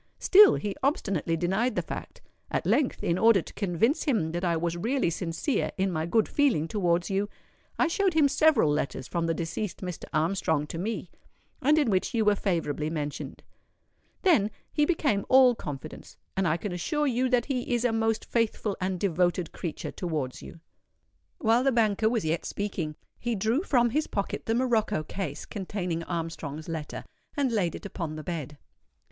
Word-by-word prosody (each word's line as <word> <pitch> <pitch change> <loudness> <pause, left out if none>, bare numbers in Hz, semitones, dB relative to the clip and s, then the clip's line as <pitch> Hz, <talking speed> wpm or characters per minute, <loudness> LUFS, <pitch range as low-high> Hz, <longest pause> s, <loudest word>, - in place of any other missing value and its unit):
Still 405 +1 +7
he 205 -2 -3
obstinately 195 - 0
denied 195 +9 0
the - - 0
fact. - - -7 0.3
At - - -1
length, 290 -4 +1
in 170 +2 +1
order 225 -3 +6
to - - -12
convince 205 - +1
him 215 - +1
that 175 +2 -3
I 170 -2 +1
was 170 +1 -1
really 230 +2 0
sincere 170 - -1
in 190 0 +1
my 160 -1 -2
good 215 +5 +2
feeling 260 - +2
towards 175 -1 0
you, 200 +1 0 0.5
I - - +3
showed 370 +1 +1
him 305 -3 +5
several 280 - +4
letters 135 -3 -2
from 170 -1 -1
the 165 - 0
deceased 170 +4 -4
Mr. 180 -3 -5
Armstrong 160 -2 +1
to 165 +2 -6
me, 200 -2 -3 0.5
and 300 +3 +4
in 285 -8 +3
which 190 +4 0
you 220 -2 +2
were 210 - +5
favourably 165 -7 -1
mentioned. 150 -3 -5 0.8
Then 300 - +4 0.2
he 295 - +3
became 290 - +1
all 260 -1 +7
confidence; 150 - -8 0.2
and 195 -1 +1
I 155 +1 +2
can 200 +3 -4
assure 295 - -1
you 255 -1 +1
that 245 -2 +2
he 255 -3 -2
is 240 0 +1
a 245 - +3
most 225 0 0
faithful 220 -3 0
and 185 -1 -1
devoted 175 -2 +1
creature 170 -4 -5
towards 155 -8 -3
you." 165 - -11 0.8
While 235 -4 +3
the 270 - +3
banker 220 -2 +2
was 230 -6 -1
yet 160 +1 0
speaking, 180 -7 -3 0.2
he 240 -1 -1
drew 220 +8 +1
from 245 - +2
his 305 +5 0
pocket 200 -1 -3
the 225 - +2
morocco 230 -10 +1
case 160 -3 -5
containing 180 -4 -3
Armstrong's 160 -3 -4
letter, 160 -3 -5 0.3
and 275 -3 +1
laid 195 -7 0
it - - -9
upon 165 -6 -4
the 155 - -7
bed. 150 -4 -5
195 Hz, 180 wpm, -28 LUFS, 165-240 Hz, 0.8 s, Still